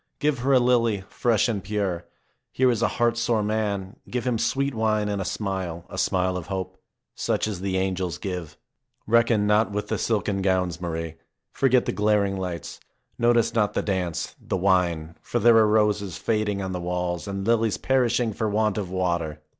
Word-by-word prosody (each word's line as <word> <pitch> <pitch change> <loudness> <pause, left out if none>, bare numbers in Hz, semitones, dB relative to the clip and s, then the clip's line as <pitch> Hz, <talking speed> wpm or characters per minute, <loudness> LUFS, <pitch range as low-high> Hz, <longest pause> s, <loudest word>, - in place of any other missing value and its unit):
Give 150 -3 +1
her 135 +3 +1
a - - +7
lily, 115 -4 +2
fresh 115 -2 +2
and 105 -5 -2
pure. 95 -4 -2 0.5
Here 130 -1 +3
is 115 -2 -1
a - - +4
heart 120 -1 +2
sore 115 -2 +1
man. 105 -2 -2
Give 125 -2 -3
him 120 -3 0
sweet 140 +3 0
wine 110 -2 +1
and 100 -1 -1
a - - -3
smile, 95 -5 -3
a - - -6
smile 90 0 +1
of 90 - -7
hope, 95 -3 -5 0.3
such - - -1
as 100 -4 -4
the 95 -1 -1
angels 95 -4 -1
give. 90 -5 -5 0.5
Reckon 115 -2 +3
not 105 +1 +3
with 105 +1 -3
the - - -1
silken 105 -3 0
gowns, 90 -2 0
Marie. 80 -2 -4 0.3
Forget 130 -2 +3
the - - 0
glaring 105 -2 +1
lights. 90 -3 -5 0.4
Notice 120 -1 +3
not 105 -3 +1
the - - 0
dance, 90 -5 -2
the - - -2
wine, 90 -4 +1
for - - -3
there 120 -1 +6
are 110 -1 +6
roses 105 -4 +1
fading 105 -3 -1
on 95 - -3
the 90 -1 -3
walls 90 +1 -2
and 100 -1 -4
lilies 115 -2 +2
perishing 120 -3 +1
for 110 +2 -1
want 105 0 +1
of 95 -4 -4
water. 85 -4 -1
105 Hz, 185 wpm, -25 LUFS, 90-115 Hz, 0.5 s, a